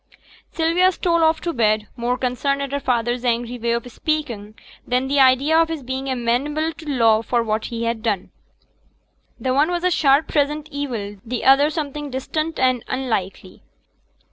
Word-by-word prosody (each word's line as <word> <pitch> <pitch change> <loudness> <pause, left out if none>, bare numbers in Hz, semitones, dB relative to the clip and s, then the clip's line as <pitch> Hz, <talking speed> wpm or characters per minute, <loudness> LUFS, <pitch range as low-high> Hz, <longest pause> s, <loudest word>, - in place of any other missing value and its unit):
Sylvia 340 +3 +3
stole 335 -2 +1
off 320 0 +3
to 340 - -2
bed; 215 -3 +1
more 245 0 -1
concerned 265 +2 -1
at 275 - -5
her 285 - -1
father's 240 -1 -1
angry 240 0 -1
way 235 0 0
of 235 0 -2
speaking 235 -9 -3 0.3
than 250 +1 0
at 265 - -4
the 280 0 +2
idea 265 +4 +4
of 330 0 +4
his 320 -4 -4
being 260 +2 -4
amenable 270 +6 -1
to 315 -2 -10
law 225 -5 +3
for 235 +1 0
what 215 -1 -1
he 230 -1 -4
had 230 -1 -1
done; 210 -5 -2 1.1
the 260 -1 -1
one 290 +5 +3
was 350 0 -2
a 365 - +2
sharp 285 -2 +3
present 295 +1 0
evil, 235 -8 -4
the 240 +1 -4
other 275 +3 +6
something 295 -2 -4
distant 310 +5 -3
and 255 -2 +2
unlikely. 205 -8 -3
260 Hz, 175 wpm, -21 LUFS, 235-300 Hz, 1.1 s, other